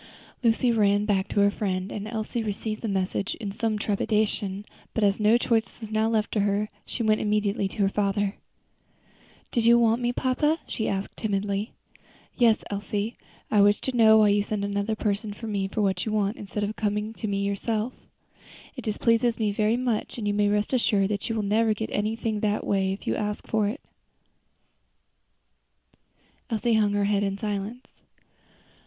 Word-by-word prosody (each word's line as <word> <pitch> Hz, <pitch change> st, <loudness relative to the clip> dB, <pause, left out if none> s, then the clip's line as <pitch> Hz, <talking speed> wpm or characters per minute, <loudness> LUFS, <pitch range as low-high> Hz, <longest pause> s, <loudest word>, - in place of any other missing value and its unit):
Lucy 240 Hz, +1 st, +3 dB
ran 205 Hz, -2 st, +3 dB
back 200 Hz, -2 st, +1 dB
to 205 Hz, -, +1 dB
her 200 Hz, 0 st, +4 dB
friend, 190 Hz, -2 st, -2 dB
and 210 Hz, 0 st, -5 dB
Elsie 220 Hz, +1 st, -3 dB
received 215 Hz, 0 st, -3 dB
the 230 Hz, -, -3 dB
message 195 Hz, 0 st, -1 dB
in 205 Hz, -4 st, -5 dB
some 220 Hz, +1 st, -1 dB
trepidation, 205 Hz, -1 st, -1 dB, 0.3 s
but 225 Hz, -, +1 dB
as 200 Hz, 0 st, +3 dB
no 215 Hz, +2 st, +5 dB
choice 230 Hz, -2 st, 0 dB
was 220 Hz, -2 st, -8 dB
now 220 Hz, +1 st, +2 dB
left 220 Hz, -1 st, 0 dB
her, 205 Hz, 0 st, +1 dB, 0.2 s
she 235 Hz, -, -2 dB
went 215 Hz, -1 st, +2 dB
immediately 210 Hz, -1 st, +1 dB
to 200 Hz, +1 st, -2 dB
her -, -, +4 dB
father. 200 Hz, 0 st, 0 dB, 1.2 s
"Did 235 Hz, -, +1 dB
you 235 Hz, +1 st, +7 dB
want 230 Hz, 0 st, +3 dB
me, 240 Hz, 0 st, +1 dB
papa?" 265 Hz, +5 st, +1 dB
she 220 Hz, -, -3 dB
asked 195 Hz, 0 st, -3 dB
timidly. 200 Hz, 0 st, -2 dB, 0.6 s
"Yes, 230 Hz, -3 st, +3 dB
Elsie; 205 Hz, +2 st, -3 dB, 0.4 s
I 210 Hz, -, +5 dB
wish 205 Hz, +1 st, +5 dB
to 260 Hz, -, -3 dB
know 220 Hz, -2 st, +7 dB
why 215 Hz, -1 st, +5 dB
you 205 Hz, 0 st, +3 dB
send 205 Hz, 0 st, -2 dB
another 200 Hz, +2 st, -1 dB
person 210 Hz, 0 st, -2 dB
to 225 Hz, -, -8 dB
me 200 Hz, -3 st, -1 dB
for 210 Hz, +2 st, -1 dB
what 190 Hz, -2 st, +1 dB
you 220 Hz, -, -3 dB
want, 210 Hz, 0 st, 0 dB
instead 205 Hz, +1 st, -4 dB
of 210 Hz, +1 st, -2 dB
coming 210 Hz, +1 st, -1 dB
yourself. 210 Hz, +3 st, -1 dB, 0.8 s
It 255 Hz, -, -6 dB
displeases 230 Hz, +1 st, +1 dB
me 215 Hz, -2 st, +1 dB
very 215 Hz, +3 st, +1 dB
much, 245 Hz, -3 st, -2 dB
and 215 Hz, -3 st, -3 dB
you 205 Hz, -, +1 dB
may 205 Hz, 0 st, +2 dB
rest 210 Hz, +4 st, 0 dB
assured 205 Hz, -5 st, +2 dB
that 205 Hz, +1 st, -2 dB
you 225 Hz, -, -1 dB
will 215 Hz, -, -1 dB
never 215 Hz, +2 st, +2 dB
get 220 Hz, +1 st, -4 dB
anything 220 Hz, +1 st, -1 dB
that 210 Hz, 0 st, 0 dB, 0.4 s
you -, -, 0 dB
ask 210 Hz, -1 st, -3 dB
for 215 Hz, -2 st, +1 dB
in 210 Hz, -, -1 dB
that -, -, -9 dB
way." -, -, -38 dB, 2.6 s
Elsie 230 Hz, 0 st, +1 dB
hung 210 Hz, -2 st, +3 dB
her 205 Hz, 0 st, +1 dB
head 205 Hz, 0 st, +2 dB
in 195 Hz, -1 st, -1 dB
silence. 210 Hz, +4 st, -4 dB
210 Hz, 180 wpm, -26 LUFS, 200-225 Hz, 2.6 s, you